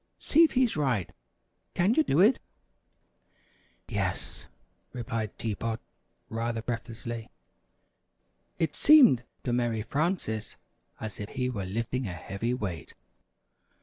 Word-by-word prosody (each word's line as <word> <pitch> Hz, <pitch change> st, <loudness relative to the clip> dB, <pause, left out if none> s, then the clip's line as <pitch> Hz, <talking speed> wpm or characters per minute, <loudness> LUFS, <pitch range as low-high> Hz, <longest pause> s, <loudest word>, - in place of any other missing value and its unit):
See 325 Hz, +3 st, +4 dB
if 325 Hz, -, +3 dB
he's 255 Hz, -2 st, +3 dB
right. 130 Hz, -, 0 dB, 0.6 s
Can 190 Hz, +6 st, +3 dB
you 315 Hz, -, +4 dB
do 160 Hz, -, +3 dB
it?" 220 Hz, +7 st, +5 dB, 1.5 s
"Yes," -, -, -3 dB, 0.5 s
replied 115 Hz, -3 st, -4 dB
Tea 110 Hz, -2 st, -2 dB
Pot 115 Hz, +2 st, -3 dB, 0.5 s
rather 115 Hz, 0 st, -2 dB
breathlessly. 115 Hz, -1 st, -5 dB, 1.3 s
(It 160 Hz, -3 st, 0 dB
seemed 275 Hz, -, +7 dB, 0.2 s
to 120 Hz, -, -1 dB
Mary 120 Hz, -3 st, 0 dB
Frances 145 Hz, -, -1 dB, 0.4 s
as 110 Hz, -2 st, -5 dB
if 105 Hz, 0 st, -5 dB
he 125 Hz, 0 st, -2 dB
were 100 Hz, -6 st, -3 dB
lifting 115 Hz, +5 st, -2 dB
a 90 Hz, -, -4 dB
heavy 100 Hz, +8 st, -3 dB
weight.) 95 Hz, -, -5 dB
120 Hz, 115 wpm, -29 LUFS, 110-145 Hz, 1.5 s, seemed